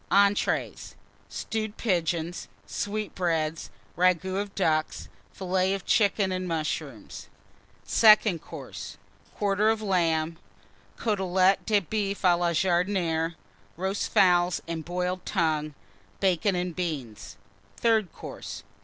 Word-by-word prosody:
ENTREES. 200 +1 +1 0.3
Stewed 220 -1 -4
Pigeons. 175 -4 -1 0.2
Sweetbreads. 175 - -2 0.3
Ragoût 185 +2 +2
of 205 -1 -8
Ducks. 155 -5 0 0.2
Fillets 190 0 0
of 195 - -7
Chickens 200 -4 +2
and 185 0 -3
Mushrooms. 160 -3 -4 0.6
SECOND 215 -6 +5
COURSE. - - -9 0.4
Quarter 205 +1 +2
of 225 0 +1
Lamb. 165 -4 +1 0.6
Cotelette 190 -3 +2
de 210 -2 +3
Boeuf 200 +1 -3
à 180 -2 +5
la 175 0 +1
Jardinière. 170 -2 +1 0.4
Roast 190 +3 -2
Fowls 180 -1 +4
and 165 -1 -4
Boiled 180 +1 -2
Tongue. 155 -5 -1 0.4
Bacon 190 0 +2
and 180 -1 -2
Beans. 145 - -5 0.4
THIRD 220 -6 +2
COURSE. - - -8
185 Hz, 105 wpm, -27 LUFS, 170-200 Hz, 0.6 s, SECOND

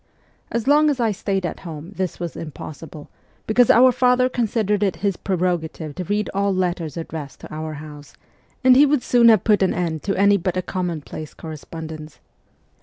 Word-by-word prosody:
As 235 -1 -2
long 300 +2 +5
as 280 -3 -1
I 230 -2 +2
stayed 195 -1 -2
at - - -4
home 165 -1 -8
this 185 -2 -3
was 175 -1 -5
impossible, 155 0 -9 0.4
because 240 +2 +3
our 255 +2 +7
father 250 +1 +3
considered 215 -4 0
it 195 -4 +1
his 200 -2 +1
preroga 180 -4 -1
tive 155 -3 -8
to 180 - -5
read 210 +4 -1
all 200 +1 +1
letters 175 -5 -2
addressed 160 -3 -7
to - - -10
our 155 0 -5
house, 150 -1 -11 0.5
and 255 0 +7
he 290 +3 +7
would 285 -3 +1
soon 235 -1 +5
have 220 -4 +5
put 210 -2 +3
an 190 - +2
end 165 -3 -2
to 195 - -2
any 200 +1 +5
but 185 0 -2
a 185 - -1
commonplace 170 -4 -5
correspondence. 160 -1 -9
185 Hz, 185 wpm, -22 LUFS, 160-220 Hz, 0.5 s, our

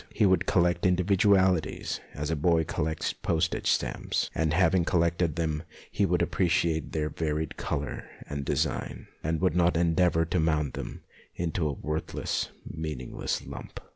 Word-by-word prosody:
He 110 - +2
would 95 -3 +3
collect 85 -2 +3
indi 90 0 +2
vidualities 95 -3 +2 0.2
as 75 +2 -3
a - - +1
boy 80 +2 +3
collects 80 0 -2
postage 80 0 0
stamps, - - 0
and 80 -1 +1
having 90 +1 +3
collected 85 -1 +1
them 80 -2 -1 0.3
he 100 - +2
would 90 -1 +1
appre 90 +1 +1
ciate 80 -1 +1
their 75 -1 -1
varied 80 -1 -2
colour 70 +1 -3 0.2
and 70 -1 -4
design, - - -2
and 80 +1 0
would 95 -1 +2
not 90 -1 +3
endeavour 85 0 +3
to 85 +1 0
mould 75 -3 +1
them - - -6 0.3
into 85 -1 -1
a 75 - -1
worthless, 75 +3 -2 0.2
meaningless 75 -6 -4
lump. - - -8
80 Hz, 155 wpm, -28 LUFS, 80-90 Hz, 0.3 s, would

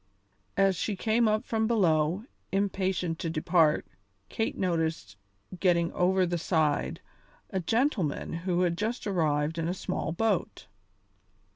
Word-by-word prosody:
As 195 -1 +4
she 200 +5 -2
came 225 +4 +2
up 215 +3 +1
from 220 -3 0
below, 180 -3 +2 0.3
impatient 190 -3 -1
to 170 - -2
depart, 160 -1 +2 0.4
Kate 225 - -2
noticed, 165 - -1 0.4
getting 170 -2 +2
over 185 +1 +2
the 175 -1 -1
side, 155 -3 0 0.5
a 190 - 0
gentleman 215 - 0
who 175 +1 -1
had 175 -1 +1
just 225 +4 -2
arrived 160 -4 0
in 165 - -1
a 180 - -1
small 165 - -3
boat. 220 +7 -1
180 Hz, 130 wpm, -28 LUFS, 165-205 Hz, 0.5 s, As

